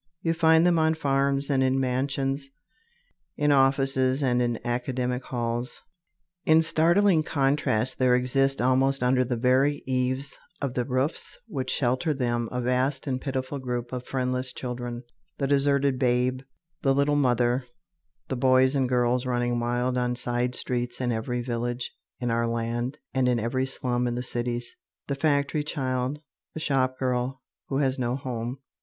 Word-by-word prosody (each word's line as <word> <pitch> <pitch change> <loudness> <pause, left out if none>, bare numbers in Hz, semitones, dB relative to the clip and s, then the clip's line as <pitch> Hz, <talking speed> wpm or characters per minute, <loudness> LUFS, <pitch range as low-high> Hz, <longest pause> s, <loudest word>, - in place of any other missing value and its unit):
You 165 - +2
find 160 0 +4
them 175 -2 +4
on 160 0 +3
farms 140 -2 +1
and 135 -1 +2
in 130 0 +2
mansions, 135 +1 -1 0.9
in 150 0 +2
offices 135 0 +3
and 125 -2 +2
in 120 -1 0
academic 125 +1 -1
halls. 120 0 -3 0.6
In 160 +1 +5
startling 165 +2 +4
contrast 135 -5 0
there 125 -1 +4
exists 135 +2 +1
almost 130 +1 +2
under 130 +1 +3
the 125 -1 -2
very 130 +4 +2
eaves 130 +1 -1 0.2
of 140 -3 -2
the 125 -1 -1
roofs 130 +4 -1
which 135 - -4
shelter 135 +5 +1
them 120 -3 -1
a 125 - -2
vast 130 +2 0
and 130 -2 -2
pitiful 135 +1 -3
group 125 -1 -4
of 125 -1 -3
friendless 130 -1 -1
children, 120 -1 -5 0.3
the 140 - -1
deserted 140 -1 +2
babe, 125 0 +1 0.4
the 135 -2 +2
"little 140 +1 +2
mother," 125 -2 +2 0.6
the 130 - -2
boys 130 +1 +4
and 130 -2 +1
girls 125 0 +1
running 120 -1 0
wild 120 +1 0
on 125 0 0
side 120 0 0
streets 120 -1 -2
in 125 -1 0
every 120 +2 -2
village 120 0 -3 0.3
in 120 -2 -1
our 115 0 +1
land 120 +4 -2 0.2
and 130 -1 +2
in 120 -1 +2
every 130 +4 -1
slum 125 -2 -1
in 120 - -2
the 125 - -3
cities, 120 -1 -3 0.3
the 140 - -2
factory 145 +1 +1
child, 130 -1 -2 0.4
the - - -3
shop 130 -3 +1
girl 125 0 -1 0.2
who 135 - -1
has 135 -1 +1
no 120 0 0
home. 125 -2 -4
130 Hz, 160 wpm, -26 LUFS, 125-135 Hz, 0.9 s, In